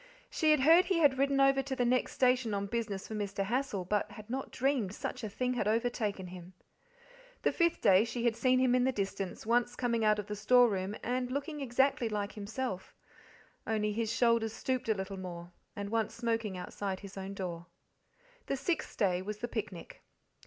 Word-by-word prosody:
She 315 - +2
had 305 -3 +5
heard 330 +6 +7
he 370 -1 +1
had 285 -5 +4
ridden 275 0 +2
over 275 0 +5
to 270 0 -4
the 245 - +1
next 250 +1 +1
station 250 -4 +2
on 200 0 -1
business 205 -2 -3
for - - -7
Mr. 200 -2 -2
Hassal, 220 -3 -1
but 205 +3 0
had 215 +2 -10
not 265 +1 -3
dreamed 250 -7 0
such - - -5
'a 215 - -3
thing 250 +4 -1
had 240 -4 -1
overtaken 220 -3 0
him. 180 0 -10 0.9
The - - +3
fifth 340 -1 +1
day 190 +2 +6
she 235 +1 -3
had 235 -2 +2
seen 255 +1 +3
him 255 -1 +3
in 250 0 +3
the 260 - +3
distance, 195 -4 -4
once 240 +2 +2
coming 235 -3 0
out 215 -1 +4
of 210 - -3
the 210 0 -5
storeroom 210 -3 +3
and 250 +1 -1
looking 285 +3 -3
exactly 265 -1 +1
like 205 -1 -2
himself, 210 -1 -5 0.7
only 210 -1 0
his 225 0 -1
shoulders 230 -2 +2
stooped 255 0 -2
a 220 - +3
little 190 0 -5
more, 175 -1 -7 0.2
and 200 0 -5
once 225 -2 0
smoking 225 -4 -1
outside 190 +1 -4
his 200 -1 -10
own 195 0 -6
door. 175 -3 -5 0.8
The 275 - -1
sixth 330 +4 -2
day 180 -3 +2
was 210 +2 -5
the 240 - -4
picnic. - - -6
225 Hz, 195 wpm, -32 LUFS, 200-255 Hz, 0.9 s, heard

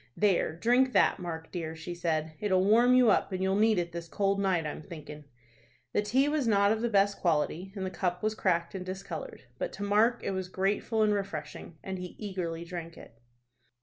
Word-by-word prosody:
"There, 195 -6 +2
drink 245 +7 +3
that, - - +4
Mark 165 -2 -6
dear," 165 -3 -4
she 160 +2 -6
said. 160 -2 -1
"It'll 190 -3 +2
warm 240 +5 +5
you 250 -4 +6
up, - - +1
and 185 0 -2
you'll 190 0 +1
need 215 0 +3
it 170 -1 -1
this 170 0 -6
cold 200 +3 0
night, 185 -5 +1
I'm 150 - -5
thinkin'." 150 -3 -10 0.7
The - - +2
tea 255 +7 +2
was 295 -4 0
not 200 -2 +4
of 220 0 0
the 235 - 0
best 200 -1 +2
quality, 170 +2 0
and 190 -2 -3
the 185 - -4
cup 180 0 -2
was 215 0 +1
cracked 170 -5 0
and 190 -2 -5
discolored; 185 -3 -7 0.2
but - - -2
to 205 - -6
Mark 215 +4 +3
it - - -1
was 190 -1 -3
grateful 205 +4 0
and 210 -1 +3
refreshing, 170 -5 -5
and 190 -1 -5
he 180 -1 -7
eagerly 175 -5 -4
drank 170 -1 -7
it. 115 0 -15
190 Hz, 210 wpm, -29 LUFS, 170-210 Hz, 0.7 s, you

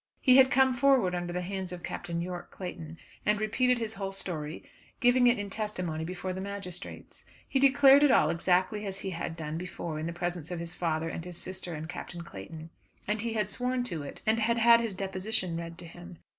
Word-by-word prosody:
He 255 0 +6
had 265 -1 +7
come 265 -1 +4
forward 250 -7 +3
under 175 -1 -2
the 180 +1 -2
hands 190 0 -4
of 180 -1 -7
Captain 170 0 -4
Yorke 175 0 -5
Clayton 165 -3 -7 0.3
and 210 0 +2
repeated 250 +4 +2
his 225 -2 -3
whole 195 -1 -4
story, 165 -5 -4 0.4
giving 245 0 +5
it 245 - +4
in 205 -1 -5
testimony 185 -7 -2
before 185 +2 -4
the 190 - -5
magistrates. 200 -2 -7 0.2
He 270 - +1
declared 275 +1 +7
it 295 - +6
all - - +5
exactly 185 +5 +1
as 195 0 -4
he 190 - -3
had 165 -1 -4
done 160 0 -4
before 170 -3 -5
in 160 - -3
the - - -3
presence 175 -2 -4
of 175 -2 -4
his 170 0 -5
father 165 -2 -1
and 165 - -5
his 175 -1 -7
sister 185 -2 -5
and 155 +1 -6
Captain 175 0 -7
Clayton. 160 - -9 0.4
And 210 +1 0
he 230 0 -2
had 210 -3 0
sworn 250 +4 -1
to 170 -10 -3
it, 145 - -8
and 220 +1 +3
had 230 +1 +2
had 235 0 +7
his 225 -4 -3
deposition 190 -1 -2
read 165 0 -6
to 175 - -8
him. 175 +1 -11
185 Hz, 215 wpm, -29 LUFS, 170-225 Hz, 0.4 s, had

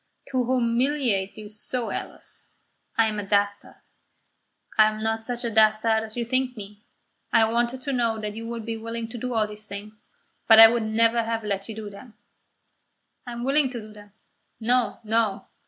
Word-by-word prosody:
"To 260 -2 +1
humiliate 240 -4 0
you 215 -1 -8
so, 225 +3 -4
Alice! - - -7 0.4
I 225 - +5
am 215 -1 -2
a - - -3
dastard. 200 0 0 1.0
I 215 - +7
am 215 0 -3
not 225 0 -1
such 245 +1 -3
a 235 - -2
dastard 220 +1 +4
as 220 +1 -8
you 235 - -1
think 255 0 -1
me. 205 +1 -11 0.4
I 225 - +5
wanted 240 +3 -1
to 280 - -2
know 230 -3 0
that 210 -1 -4
you 225 +1 -6
would 230 -1 -5
be 225 -1 -3
willing 230 +1 -5
to 240 - -7
do 250 +1 -3
all 220 -1 +3
these 210 0 -10
things, 210 +1 -9 0.4
but 225 -1 +8
I 225 0 +12
would 235 0 0
never 230 +2 +2
have 225 0 -2
let 200 0 -3
you 220 - -6
do 215 -2 -7
them." 215 +3 -13 1.1
"I 240 - -5
am 235 0 -5
willing 275 +1 +2
to 245 -2 -5
do 215 -1 -11
them." 205 -1 -15 0.5
"No, 245 +2 +1
no." 220 -2 0
225 Hz, 190 wpm, -25 LUFS, 215-240 Hz, 1.1 s, I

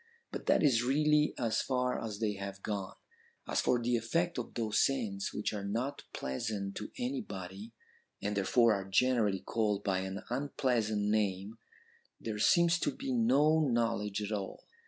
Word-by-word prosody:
But - - -6
that - - +4
is 125 -6 +4
really 150 +4 +3
as 115 -3 +1
far 125 -1 -1
as 110 -3 -4
they 105 -1 0
have 100 0 -7
gone. 100 0 -3 0.5
As - - +1
for 125 - +2
the 120 +1 +1
effect 165 +8 0
of 120 - -6
those 110 -3 0
scents 110 -8 -1
which 105 - -2
are 100 -2 -4
not 120 +8 -3
pleasant 100 - -3
to - - -5
anybody, 115 - -5 0.5
and 105 +1 -2
therefore 115 +3 +4
are 100 -2 -2
generally 105 -3 +2
called 105 -3 0
by 95 -2 +1
an 95 +1 -5
unpleasant 120 -5 0
name, 105 0 0 0.6
there 110 -2 -4
seems 170 +8 +4
to - - 0
be 270 -1 -3
no 160 - +4
knowledge 115 -7 0
at 105 - -4
all.' 100 -3 -4
110 Hz, 160 wpm, -32 LUFS, 100-130 Hz, 0.6 s, that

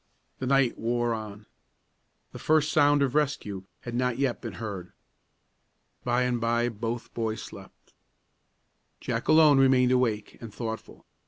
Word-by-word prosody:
The 130 - -3
night 135 -2 +2
wore 120 +1 0
on. 105 -1 -7 0.9
The - - -9
first 155 0 +2
sound 145 -1 +4
of 130 -3 0
rescue 135 -11 -1 0.2
had 120 - -7
not 125 0 0
yet 135 -3 -1
been 115 - -6
heard. 100 -6 -7 1.1
By 120 +1 +1
and 125 -2 -1
by 120 +1 +1
both 115 +1 -5
boys 110 -1 -3
slept. - - -13 1.1
Jack - - -3
alone 155 -3 +6
remained 130 -2 +4
awake 115 -5 0
and 115 -2 -8
thoughtful. 110 +1 -7
120 Hz, 140 wpm, -27 LUFS, 115-135 Hz, 1.1 s, alone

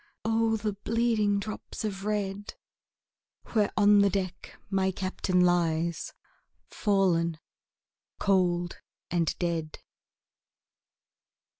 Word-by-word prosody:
O 225 0 +2
the 210 -1 -2
bleeding 215 -1 +1
drops 215 +1 -6
of 195 -2 -4
red, 205 -1 -2 1.0
Where 210 -3 +2
on 205 0 +6
the 200 0 +5
deck 185 -1 -4
my 190 -1 +1
Captain 185 -1 0
lies, 170 -2 +1 0.6
Fallen 180 -6 +1 0.8
cold 175 -3 +1 0.3
and 170 -3 0
dead. 165 -3 -2
195 Hz, 90 wpm, -28 LUFS, 175-210 Hz, 1.0 s, on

